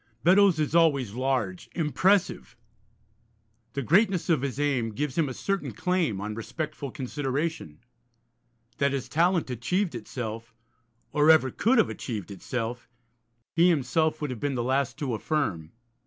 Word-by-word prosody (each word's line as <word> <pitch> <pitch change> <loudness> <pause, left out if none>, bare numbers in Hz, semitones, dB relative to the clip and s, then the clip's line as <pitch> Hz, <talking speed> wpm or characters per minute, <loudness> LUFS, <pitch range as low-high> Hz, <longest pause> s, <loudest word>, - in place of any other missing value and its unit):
Beddoes 190 -1 +5
is 150 0 -1
always 140 -10 +3
large, 125 -7 -2
impressive; 175 - +1 1.2
the 140 - -2
greatness 185 - +2
of 155 - +2
his 135 -1 -3
aim 135 -6 +1
gives 145 +3 -3
him 160 -5 +1
a - - -4
certain 195 -1 -2
claim 180 - 0
on 105 +2 -4
respectful 150 +5 -5
consideration. 135 - -3 1.0
That 140 0 +2
his 130 -2 -3
talent 165 +2 +1
achieved 180 - -1
itself, 115 -1 -6 0.6
or 150 +1 +3
ever 155 -5 +6
could 245 - +2
have 225 - +3
achieved 105 -6 -5
itself, 120 +4 -5 0.7
he 170 +2 +5
himself 160 0 +1
would 150 -3 -2
have 125 - -6
been 140 +1 -1
the 120 - -1
last 130 +2 0
to 140 -6 -2
affirm. 105 - -2
140 Hz, 140 wpm, -27 LUFS, 120-165 Hz, 1.2 s, ever